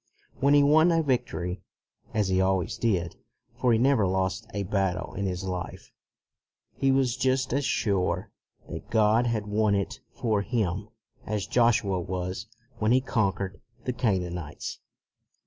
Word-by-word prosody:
When 140 +2 +4
he 145 - +6
won 155 +4 +5
a 165 -1 +3
victory, 95 - -1 0.5
as 105 -3 0
he 95 0 +2
always 95 -2 +1
did, 90 -7 0 0.4
for 125 - +1
he 115 - +4
never 125 -4 +3
lost 95 +3 -1
a 100 - -2
battle 95 -2 -1
in 100 -1 -2
his 90 0 -3
life, 90 -2 -5 0.8
he 135 - +2
was 130 -2 +2
just 130 0 +1
as 140 0 +1
sure 100 -8 0 0.4
that - - -8
God 110 +2 +3
had 110 -3 -1
won 105 0 +2
it 100 -1 -2
for 110 -4 0
him 105 -3 -1 0.4
as 105 -3 -1
Joshua 115 -6 +2
was 90 +3 -4 0.3
when 110 +1 +2
he 130 - +6
conquered 100 -6 -1 0.2
the 125 - -1
Canaanites. 90 - -2
105 Hz, 145 wpm, -27 LUFS, 95-125 Hz, 0.8 s, he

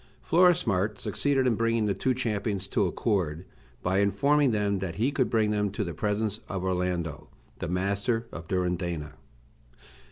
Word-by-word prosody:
Florismart 115 - +3
succeeded 140 -2 +1
in 125 - +3
bringing 115 0 +1
the 100 - +1
two 130 +5 0
champions 105 -5 -2
to - - +1
accord, 90 -6 -1 0.4
by 95 +2 +2
informing 140 +8 +3
them 105 -3 0
that 90 -3 -4
he 120 +9 +1
could 135 -3 +1
bring 110 -2 +2
them 105 -1 +1
to 105 +2 -3
the 85 -3 -4
presence 105 +4 -1
of 95 -2 -3
Orlando, 90 -4 -2 0.3
the - - -3
master 100 +6 0
of 85 -1 -8
Durindana. 85 -5 -2
100 Hz, 155 wpm, -28 LUFS, 90-115 Hz, 0.4 s, Florismart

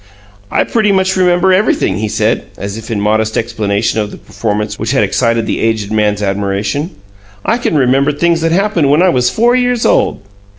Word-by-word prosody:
"I - - -10
remember - - +1
pretty 215 -3 +3
much 190 -1 +1
everything," 185 - +2
he 110 +1 -2
said, - - 0
as 100 0 -5
if 110 +1 -9
in 110 -3 -2
modest 110 +1 0
explanation 110 -2 -1
of 105 -1 -2
the - - -10
performance 105 -1 -4
which 115 +4 -2
had 135 - +2
excited 115 -2 0
the - - -2
aged 110 -2 -1
man's 105 -1 0
admiration. 100 - -2 0.6
"I 235 - +1
can 165 - 0
remember 135 +2 +2
things 165 +3 0
that 165 0 0
happened 185 -5 +1
when 150 +5 +4
I 185 - +4
was 125 -6 +2
four 240 +2 +2
years 245 -2 0
old." - - +1
125 Hz, 195 wpm, -13 LUFS, 105-180 Hz, 0.6 s, when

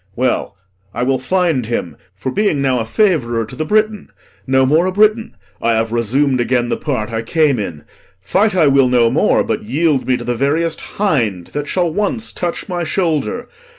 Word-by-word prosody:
Well, 125 -5 -1 0.4
I - - -1
will 130 0 +1
find 160 -4 0
him; 90 -9 -3 0.2
For 100 +7 -4
being 200 -6 +1
now 130 -2 +1
a 115 - -2
favourer 120 - +1
to 110 - -11
the 155 - -3
Briton, 215 +2 0 0.4
No 130 0 +3
more 155 +7 +3
a - - 0
Briton, 215 +3 +2 0.3
I 115 0 +2
have 110 0 0
resum'd 125 +3 +1
again 120 0 0
The - - -1
part 115 -7 -3
I 115 - -1
came 145 +1 +1
in. 85 -7 -5 0.4
Fight 190 - +1
I 170 -4 +4
will 135 -2 +4
no 120 -2 +3
more, - - +2
But - - -2
yield 140 +4 0
me 130 -1 +2
to 120 - -7
the 120 +1 -1
veriest 155 +6 0 0.2
hind 115 - 0
that 145 0 -3
shall 175 -3 0
Once 210 +4 -2
touch 175 -1 -3
my 175 -2 -2
shoulder. 170 - -1
140 Hz, 190 wpm, -17 LUFS, 120-175 Hz, 0.4 s, I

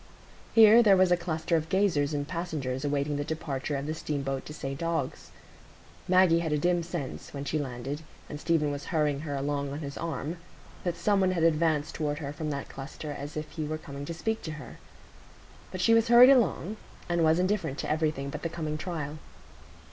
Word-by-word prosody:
Here 225 +1 +9
there 200 -4 +6
was 185 -1 +4
a - - +7
cluster 170 -1 -1
of 160 0 -1
gazers 180 -7 +2
and 145 -1 -2
passengers 150 -7 -3
awaiting 145 0 0
the 145 - -1
departure 145 -2 -3
of 140 0 -3
the 155 - -2
steamboat 140 -3 -3
to - - -8
St 135 0 -5
Ogg's. 165 -5 -2 0.8
Maggie 185 -2 +5
had 165 -2 -2
a 150 - +2
dim 175 +3 +2
sense, 170 -5 -6
when 140 0 -4
she 155 - -1
had 145 - -1
landed, 135 +4 -5 0.3
and 150 - -7
Stephen 155 -3 +1
was 145 0 -5
hurrying 150 -4 0
her 145 -1 -4
along 140 0 -2
on 140 - -4
his 140 -2 -6
arm, 165 0 -3 0.5
that 175 -2 -1
some 200 +3 +2
one 190 -1 +3
had 170 -3 0
advanced 155 -2 +2
toward 150 -2 -2
her 145 -2 -5
from 155 +1 -4
that 140 -1 -4
cluster 140 +2 -7
as 145 +1 -6
if 155 0 -3
he 160 0 -4
were 155 +1 -3
coming 140 -2 -8
to 170 - -4
speak 220 +6 -2
to 160 - -5
her. 150 -4 -10 0.9
But 185 - -4
she 230 - +5
was 230 +1 +4
hurried 240 +3 +9
along, 215 -5 +2 0.3
and 170 -1 +1
was 160 +1 +4
indifferent 185 -6 0
to - - -3
everything 155 -3 -1
but 150 - -6
the 165 - -2
coming 155 -2 -4
trial. 155 -4 -4
155 Hz, 210 wpm, -28 LUFS, 145-170 Hz, 0.9 s, Here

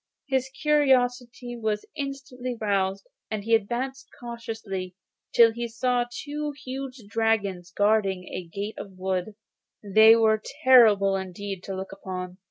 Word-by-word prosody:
His 265 -1 0
curiosity 250 -4 +1
was 215 -2 -2
instantly 270 -4 -5
roused, 195 -2 0 0.2
and 215 -2 -3
he 230 +2 0
advanced 245 +5 -1
cautiously 225 -6 -6 0.4
till 230 -1 +6
he 235 +1 -3
saw 245 +1 0
two 295 +3 -4
huge 260 -1 -6
dragons 205 -5 0
guarding 205 -2 +2
the 180 -1 -7
gate 200 +4 -5
of - - -6
a - - -19
wood. 185 +2 -2 0.5
They 220 +3 +7
were 220 -1 +3 0.2
terrible 215 -7 +6
indeed 190 0 -5
to 195 - -4
look 190 +1 -6
upon. 185 -1 -6
225 Hz, 135 wpm, -26 LUFS, 195-250 Hz, 0.5 s, They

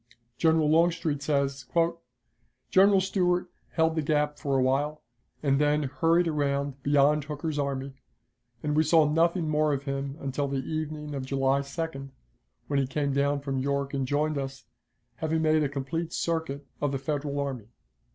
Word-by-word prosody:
General 160 0 +3
Longstreet 165 -2 +2
says: 140 -2 0 1.1
"General 195 +1 +6
Stuart 180 -2 0 0.2
held 160 -1 +2
the 160 - +1
gap 150 0 0
for 140 -3 0
a - - +3
while, 145 +4 0 0.4
and 135 0 +2
then 150 0 +2
hurried 165 +6 +2
around 140 -2 -1
beyond 145 +1 +3
Hooker's 150 0 -3
army, 140 -1 -2 0.7
and 150 0 0
we 155 - +5
saw 160 0 +4
nothing 165 +2 +2
more 155 0 +2
of 140 0 -2
him 140 0 -3
until 140 +1 -2
the 140 0 -2
evening 155 -1 -4
of 135 -2 -3
July 135 0 +2
2d, 140 -1 -5 0.6
when 140 -1 0
he 135 - 0
came 140 0 -1
down 140 +1 +1
from 135 -1 -2
York 140 +1 -1
and 135 -2 -1
joined 150 +1 0
us, 135 -1 -6 0.5
having 160 0 0
made 155 0 +3
a 145 - +1
complete 145 +4 -3
circuit 160 -4 -2 0.2
of 145 -1 +1
the 135 - -1
Federal 145 +1 -2
army." 130 -7 -3
145 Hz, 160 wpm, -28 LUFS, 140-155 Hz, 1.1 s, General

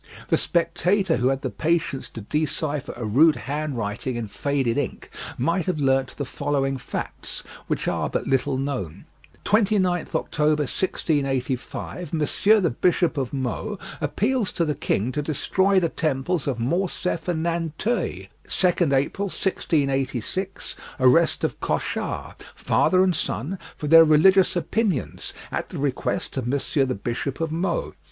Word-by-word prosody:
The - - +4
spectator 175 +2 +1
who 125 - +2
had 135 0 0
the - - -2
patience 165 -4 -1
to 115 - -8
decipher 150 +3 -1
a 120 - -5
rude 150 +9 +5
handwriting 130 -5 -3
in 115 -2 -3
faded 135 -1 0
ink - - -3 0.3
might 170 +8 0
have 180 -4 0
learnt 135 -2 +1
the 145 - -2
following 135 0 -1
facts, - - -5 0.2
which - - -1
are - - 0
but - - -2
little 135 0 +1
known: 130 - -4 0.4
"29th 195 -5 +2
October, 150 -1 +1
1685, 140 +1 -2
Monsieur 195 +7 +3
the 170 -7 +1
Bishop 175 +6 +2
of 135 -4 -2
Meaux, 140 - -3 0.2
appeals 210 - 0
to 170 - +1
the 150 - 0
king 115 -3 -1
to 150 - -1
destroy 190 +6 +2
the 170 - +1
temples 155 +1 -1
of 135 -4 0
Morcef 175 +6 -1
and 165 -3 0
Nanteuil" 170 +7 -1 0.2
"2nd 175 -5 +2
April, 140 +9 +1
1686, 145 - -1 0.2
Arrest 155 +6 +4
of - - -1
Cochard, - - -3
father 185 0 +3
and 185 -2 +2
son, 155 - -3 0.2
for - - -5
their 165 +2 +9
religious 180 +6 +5
opinions, 185 - -1 0.2
at - - -3
the - - -6
request 135 0 -2
of 125 -2 -2
Monsieur 140 +1 +1
the 130 -1 -2
Bishop 120 +6 -3
of 165 -1 -1
Meaux. 170 +2 -1
150 Hz, 145 wpm, -24 LUFS, 135-180 Hz, 0.4 s, their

